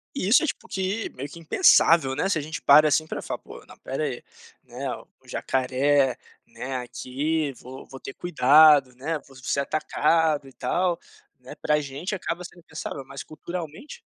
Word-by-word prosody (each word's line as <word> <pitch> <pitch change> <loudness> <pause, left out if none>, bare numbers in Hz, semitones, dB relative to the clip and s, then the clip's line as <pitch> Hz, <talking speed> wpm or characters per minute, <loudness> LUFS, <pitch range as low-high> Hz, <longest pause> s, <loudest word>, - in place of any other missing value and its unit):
E 230 - -2
isso 225 +9 +5
é - - +2
tipo - - -5
que 195 +3 -2
meio 135 +3 -5
que 170 - -12
impensável, 165 - +4
né, 150 - 0
se 195 - +1
a - - -1
gente 155 +2 -6
para 150 +2 +7
assim 155 +1 +2
para - - -5
falar: - - -5
"Pô, - - -13
não - - -14
espera 135 +4 -4
aí, 130 -5 -4 0.4
né, - - -6 0.3
o - - -26
jacaré, 130 0 +1 0.3
né, 135 +1 -6
aqui 140 +5 -2
vou 130 +2 -11
vou 135 - -11
ter 135 - -8
cuidado, 145 -4 +5
né, 150 +6 -3
vou 135 - -17
ser 130 +2 -1
atacado 155 0 +1
e 135 - -15
tal", 175 +8 0 0.4
né, 125 0 -11
para 150 0 +1
gente 145 +8 -5
acaba 180 -2 -4
sendo 175 0 -12
pensado, 155 -4 -7
mas 135 0 -8
culturalmente. 165 - -8
150 Hz, 180 wpm, -25 LUFS, 135-165 Hz, 0.4 s, para